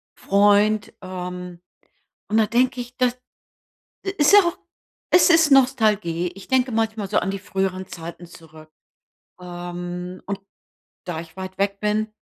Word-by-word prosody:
Freund, 205 Hz, +1 st, +3 dB
ähm, 180 Hz, -1 st, -7 dB, 0.7 s
und 215 Hz, -, +1 dB
da 220 Hz, -, +5 dB
denke 250 Hz, +2 st, +1 dB
ich, 245 Hz, +1 st, -14 dB
das 250 Hz, -1 st, +1 dB, 1.0 s
ist 295 Hz, +5 st, +4 dB
ja 410 Hz, -, +11 dB
auch 345 Hz, -2 st, -2 dB, 0.5 s
es 355 Hz, -, +6 dB
ist 325 Hz, -3 st, +5 dB
Nostalgie. 215 Hz, -10 st, +2 dB
Ich 195 Hz, -, -12 dB
denke 260 Hz, -1 st, +2 dB
manchmal 220 Hz, -3 st, -1 dB
so 210 Hz, -, +1 dB
an 195 Hz, -, -2 dB
die 195 Hz, -, -5 dB
früheren 190 Hz, -1 st, -3 dB
Zeiten 170 Hz, +1 st, -9 dB
zurück, 160 Hz, -2 st, -15 dB, 0.7 s
ähm, 175 Hz, 0 st, -7 dB
und 200 Hz, 0 st, -4 dB, 0.7 s
da 165 Hz, -2 st, -4 dB
ich 165 Hz, +1 st, -13 dB
weit 190 Hz, 0 st, -7 dB
weg 200 Hz, 0 st, 0 dB
bin, 215 Hz, +1 st, 0 dB
195 Hz, 140 wpm, -22 LUFS, 180-225 Hz, 1.0 s, ja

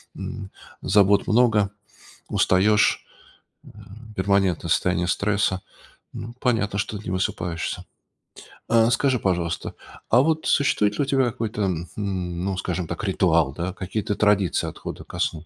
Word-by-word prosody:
м, 95 Hz, -1 st, -7 dB, 0.3 s
забот 100 Hz, 0 st, +3 dB
много, 110 Hz, -4 st, +3 dB, 0.6 s
устаешь, 105 Hz, +3 st, +3 dB, 0.6 s
э, -, -, -14 dB, 0.5 s
перманентное 95 Hz, -3 st, +1 dB
состояние 90 Hz, +1 st, +1 dB
стресса. 100 Hz, -1 st, 0 dB, 0.5 s
Ну 115 Hz, +2 st, -7 dB
понятно, 105 Hz, -5 st, 0 dB
что 105 Hz, +1 st, -2 dB
не 100 Hz, -, -7 dB
высыпаешься. 90 Hz, -2 st, -2 dB, 0.9 s
А 115 Hz, 0 st, +5 dB
скажи, 130 Hz, 0 st, +2 dB
пожалуйста, 85 Hz, -4 st, -1 dB, 0.4 s
а 120 Hz, -, +6 dB
вот 160 Hz, +2 st, 0 dB
существует 105 Hz, -7 st, +2 dB
ли -, -, +3 dB
у -, -, -1 dB
тебя 135 Hz, -1 st, +2 dB
какой-то, 115 Hz, -3 st, -2 dB, 0.3 s
хм, 90 Hz, -4 st, -3 dB
ну, 95 Hz, -1 st, -2 dB
скажем 90 Hz, -2 st, -3 dB
так, 120 Hz, -, -5 dB
ритуал, 85 Hz, -7 st, +2 dB
да, 90 Hz, +5 st, -4 dB
какие-то 100 Hz, +2 st, -3 dB
традиции 100 Hz, -3 st, +2 dB
отхода -, -, -8 dB
ко -, -, -9 dB
сну? 80 Hz, 0 st, -1 dB
100 Hz, 130 wpm, -24 LUFS, 90-110 Hz, 0.9 s, а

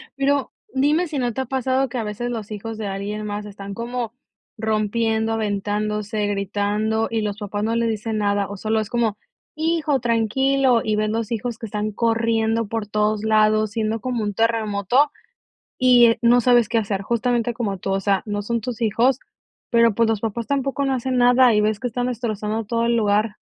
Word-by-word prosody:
Pero, 280 Hz, 0 st, +1 dB, 0.2 s
dime 295 Hz, +6 st, +2 dB
si 300 Hz, -3 st, -3 dB
no 245 Hz, -2 st, -1 dB
te 265 Hz, -, -2 dB
ha -, -, -3 dB
pasado, 265 Hz, 0 st, 0 dB
que 250 Hz, -, -5 dB
a 230 Hz, -, -1 dB
veces 215 Hz, +3 st, -4 dB
los 225 Hz, -3 st, -5 dB
hijos 220 Hz, +1 st, -6 dB
de 215 Hz, -2 st, -4 dB
alguien 205 Hz, +2 st, -4 dB
más, 210 Hz, 0 st, -4 dB
están 200 Hz, -1 st, -8 dB
como 235 Hz, 0 st, -4 dB, 0.4 s
rompiendo, 220 Hz, +1 st, 0 dB
aventándose, 210 Hz, 0 st, -1 dB
gritando, 205 Hz, +2 st, -1 dB
y 225 Hz, -1 st, -1 dB
los 205 Hz, -1 st, -3 dB
papás 205 Hz, -1 st, -4 dB
no 225 Hz, +1 st, 0 dB
les 230 Hz, 0 st, +1 dB
dicen 220 Hz, 0 st, -2 dB
nada, 205 Hz, -1 st, +1 dB
o 205 Hz, -, -6 dB
solo 220 Hz, +3 st, 0 dB
es 215 Hz, -1 st, -3 dB
como: 235 Hz, -4 st, 0 dB, 0.4 s
"Hijo, 315 Hz, -3 st, +1 dB
tranquilo", 245 Hz, +2 st, +2 dB
y 215 Hz, -, 0 dB
ves 215 Hz, 0 st, 0 dB
los 225 Hz, 0 st, -2 dB
hijos 230 Hz, +1 st, -3 dB
que 225 Hz, -, -6 dB
están 210 Hz, +1 st, -3 dB
corriendo 225 Hz, 0 st, +1 dB
por 220 Hz, -1 st, -3 dB
todos 210 Hz, 0 st, 0 dB
lados, 215 Hz, -1 st, +3 dB
siendo 220 Hz, 0 st, -1 dB
como 245 Hz, -2 st, -2 dB
un 205 Hz, -1 st, -2 dB
terremoto, 225 Hz, +4 st, +1 dB, 0.7 s
y 250 Hz, -2 st, +6 dB
eh, 230 Hz, -, +3 dB
no 240 Hz, +1 st, +5 dB
sabes 240 Hz, -2 st, +4 dB
qué 230 Hz, -, +1 dB
hacer, 200 Hz, -3 st, -2 dB
justamente 240 Hz, +2 st, 0 dB
como 205 Hz, -5 st, -3 dB
tú, 195 Hz, -, -4 dB
o 195 Hz, -, 0 dB
sea, 195 Hz, -1 st, +1 dB
no 205 Hz, -1 st, -3 dB
son 235 Hz, +2 st, -1 dB
tus 240 Hz, +1 st, -5 dB
hijos, 235 Hz, +3 st, +2 dB, 0.5 s
pero, 230 Hz, -2 st, +4 dB
pues, 230 Hz, +1 st, +2 dB
los 220 Hz, -2 st, 0 dB
papás 225 Hz, +1 st, -3 dB
tampoco 275 Hz, 0 st, -1 dB
no 270 Hz, -, +1 dB
hacen 255 Hz, +1 st, -1 dB
nada, 245 Hz, 0 st, +5 dB
y 210 Hz, -, +4 dB
ves 210 Hz, 0 st, 0 dB
que 250 Hz, -, -1 dB
están 245 Hz, +1 st, -2 dB
destrozando 220 Hz, -2 st, -2 dB
todo 230 Hz, +2 st, 0 dB
el 235 Hz, 0 st, +2 dB
lugar. 210 Hz, 0 st, +1 dB
225 Hz, 200 wpm, -22 LUFS, 210-240 Hz, 0.7 s, y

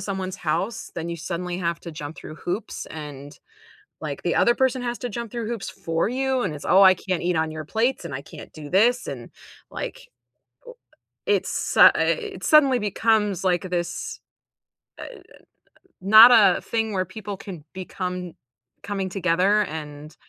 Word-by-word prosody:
someone's 190 Hz, -1 st, -4 dB
house, 190 Hz, +7 st, -3 dB
then 170 Hz, 0 st, -4 dB
you 170 Hz, -, -4 dB
suddenly 175 Hz, +2 st, -4 dB
have 170 Hz, -2 st, -2 dB
to 170 Hz, -, -9 dB
jump 150 Hz, 0 st, -7 dB
through 155 Hz, -, -9 dB
hoops 180 Hz, +7 st, -5 dB
and 145 Hz, -2 st, -9 dB, 0.6 s
like -, -, -5 dB
the -, -, 0 dB
other 240 Hz, -, +4 dB
person 260 Hz, -1 st, +1 dB
has 240 Hz, -1 st, -3 dB
to 245 Hz, -, -4 dB
jump 235 Hz, +2 st, -5 dB
through 235 Hz, -2 st, -4 dB
hoops 230 Hz, -4 st, -4 dB
for 165 Hz, +2 st, -2 dB
you 260 Hz, +2 st, 0 dB
and 175 Hz, -9 st, -2 dB
it's, 145 Hz, -, -9 dB
"Oh, 195 Hz, -, +5 dB
I 190 Hz, -1 st, +8 dB
can't 185 Hz, 0 st, -3 dB
eat 175 Hz, 0 st, 0 dB
on 160 Hz, 0 st, 0 dB
your 155 Hz, -1 st, -7 dB
plates 235 Hz, -, -1 dB
and 130 Hz, -, -5 dB
I 140 Hz, -, -5 dB
can't -, -, -12 dB
do 150 Hz, -2 st, -9 dB
this." 235 Hz, -, +3 dB
And -, -, -7 dB, 0.4 s
like -, -, -7 dB, 1.2 s
it's 415 Hz, -, +1 dB
su -, -, +6 dB
it 430 Hz, -5 st, -1 dB
suddenly 280 Hz, -5 st, +5 dB
becomes 210 Hz, -2 st, 0 dB
like 185 Hz, 0 st, +1 dB
this, 175 Hz, -1 st, -3 dB, 0.8 s
uh, -, -, -6 dB, 1.0 s
not 220 Hz, +5 st, +9 dB
a 205 Hz, -6 st, +6 dB
thing 225 Hz, -2 st, -2 dB
where 185 Hz, -, 0 dB
people 205 Hz, +2 st, -7 dB
can 175 Hz, -8 st, -10 dB
become 180 Hz, -1 st, -5 dB, 0.5 s
coming 195 Hz, -2 st, -3 dB
together 185 Hz, +3 st, +2 dB
and 150 Hz, -1 st, -8 dB
190 Hz, 165 wpm, -23 LUFS, 170-225 Hz, 1.2 s, not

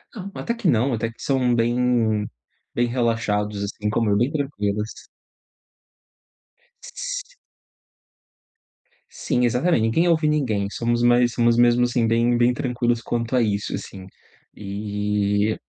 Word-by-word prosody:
Não, 200 Hz, -2 st, -7 dB
até 235 Hz, -, -2 dB
que 230 Hz, -6 st, -2 dB
não, 125 Hz, 0 st, +2 dB
até 115 Hz, 0 st, -2 dB
que 115 Hz, -, -18 dB
são 130 Hz, -3 st, +1 dB
bem 115 Hz, -3 st, +1 dB, 0.5 s
bem 120 Hz, 0 st, +1 dB
relaxados, 115 Hz, -4 st, -1 dB
assim 105 Hz, +1 st, -3 dB
como 110 Hz, 0 st, 0 dB
eu, 100 Hz, -, +3 dB
bem 120 Hz, +6 st, +1 dB
tranquilos. 105 Hz, -8 st, -2 dB, 1.9 s
S -, -, -6 dB, 1.8 s
Sim, 125 Hz, -, -1 dB
exatamente, 125 Hz, +4 st, +2 dB
ninguém 115 Hz, +11 st, +2 dB
ouve 160 Hz, -2 st, +2 dB
ninguém, 115 Hz, -10 st, 0 dB
somos 120 Hz, +2 st, -1 dB
mais 120 Hz, 0 st, +4 dB
somos 120 Hz, -1 st, +2 dB
mesmo 120 Hz, 0 st, +4 dB
assim, 120 Hz, -1 st, +1 dB
bem 115 Hz, +1 st, +2 dB
bem 120 Hz, +1 st, +3 dB
tranquilos 120 Hz, -2 st, -1 dB
quanto 120 Hz, +2 st, -2 dB
a 125 Hz, -, +4 dB
isso, 105 Hz, -2 st, -1 dB
assim, 95 Hz, -1 st, -7 dB, 0.5 s
e 105 Hz, +1 st, -1 dB
120 Hz, 130 wpm, -22 LUFS, 105-125 Hz, 1.9 s, mais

